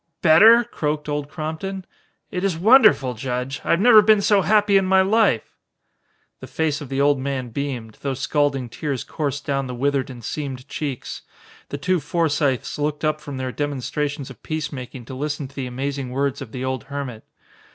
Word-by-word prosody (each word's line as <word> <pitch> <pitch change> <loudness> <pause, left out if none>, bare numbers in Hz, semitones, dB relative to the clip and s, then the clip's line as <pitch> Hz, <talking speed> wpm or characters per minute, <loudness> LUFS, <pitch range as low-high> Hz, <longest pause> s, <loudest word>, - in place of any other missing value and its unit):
Better?" 215 +9 +7
croaked 150 -9 -3
Old 145 -1 -3
Crompton. 175 +5 -5 0.5
"It 180 - -3
is 190 -5 0
wonderful, 205 - +5
Judge. 125 +3 -4
I - - -6
have 170 - +4
never 220 0 +8
been 215 0 +5
so 200 0 +3
happy 210 +1 +3
in 195 - +5
my 190 0 +4
life!" 200 - +2 0.9
The - - -9
face 155 -2 -1
of 145 - -8
the 135 0 -2
old 140 -1 +3
man 130 -2 -3
beamed, 120 -4 -5
though 135 -1 -2
scalding 135 -1 0
tears 135 +1 -4
coursed 145 -2 -4
down 135 -2 -1
the 125 - -5
withered 140 +1 0
and 120 -2 -10
seamed 135 0 -5
cheeks. 140 -5 -5 0.5
The 140 - -4
two 180 +5 +1
Forsythes 150 -4 -1
looked 150 +1 -1
up 155 0 0
from 145 -3 -7
their 130 -1 -3
demonstrations 145 0 -3
of 120 - -14
peacemaking 135 -5 -5
to 130 - -9
listen 145 +1 -3
to 135 - -19
the 135 -2 -4
amazing 135 +1 -4
words 140 +2 -1
of 125 -5 -8
the 130 +2 -4
old 130 -2 -3
hermit. 135 -6 -6
145 Hz, 185 wpm, -22 LUFS, 130-160 Hz, 0.9 s, never